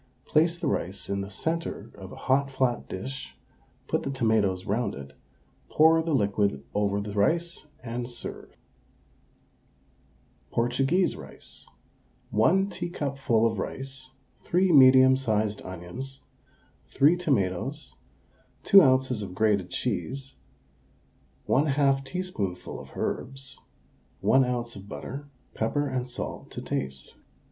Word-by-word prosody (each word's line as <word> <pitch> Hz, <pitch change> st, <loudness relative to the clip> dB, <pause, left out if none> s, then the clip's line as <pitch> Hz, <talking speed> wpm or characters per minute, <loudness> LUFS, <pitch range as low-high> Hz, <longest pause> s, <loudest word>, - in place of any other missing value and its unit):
Place 165 Hz, +2 st, +3 dB
the 170 Hz, -, -4 dB
rice 95 Hz, -5 st, -2 dB
in 100 Hz, 0 st, -1 dB
the 100 Hz, -, -6 dB
centre 160 Hz, -2 st, -3 dB
of 95 Hz, -2 st, -10 dB
a -, -, -9 dB
hot 135 Hz, +1 st, +3 dB
flat 130 Hz, -2 st, -1 dB
dish, 130 Hz, +8 st, -6 dB, 0.5 s
put -, -, 0 dB
the -, -, -4 dB
tomatoes 110 Hz, -8 st, +1 dB
round 105 Hz, +1 st, -1 dB
it, 70 Hz, 0 st, -9 dB, 0.6 s
pour 160 Hz, +1 st, +5 dB
the 160 Hz, -2 st, 0 dB
liquid 100 Hz, -, +1 dB
over 100 Hz, -1 st, +1 dB
the 100 Hz, 0 st, -5 dB
rice, 165 Hz, +11 st, 0 dB, 0.2 s
and 120 Hz, 0 st, -4 dB
serve. 120 Hz, -, -8 dB, 1.9 s
PORTUGUESE 135 Hz, +10 st, +1 dB
RICE. 70 Hz, -3 st, -11 dB, 0.6 s
1 185 Hz, -, +3 dB
teacupful 135 Hz, -9 st, 0 dB
of 110 Hz, -3 st, 0 dB
rice, 130 Hz, +3 st, -5 dB, 0.3 s
3 185 Hz, +1 st, +2 dB
medium 130 Hz, -2 st, +8 dB
sized 110 Hz, -5 st, 0 dB
onions, 95 Hz, +10 st, -6 dB, 0.7 s
3 145 Hz, +5 st, +4 dB
tomatoes, 135 Hz, -, -1 dB, 0.7 s
2 195 Hz, -, +8 dB
oz. 130 Hz, -, +3 dB
of 95 Hz, -3 st, -6 dB
grated 100 Hz, -3 st, +2 dB
cheese, 130 Hz, +6 st, -3 dB, 1.1 s
1/2 140 Hz, -1 st, +3 dB
teaspoonful 130 Hz, -, -4 dB
of -, -, -12 dB
herbs, 135 Hz, +1 st, -4 dB, 0.6 s
1 135 Hz, 0 st, +5 dB
oz. 120 Hz, -1 st, -2 dB
of 100 Hz, 0 st, -11 dB
butter, 140 Hz, +6 st, -7 dB, 0.3 s
pepper 145 Hz, +6 st, 0 dB
and 130 Hz, -2 st, -2 dB
salt 125 Hz, -, -6 dB
to -, -, -7 dB
taste. 65 Hz, 0 st, -4 dB
130 Hz, 120 wpm, -27 LUFS, 100-140 Hz, 1.9 s, medium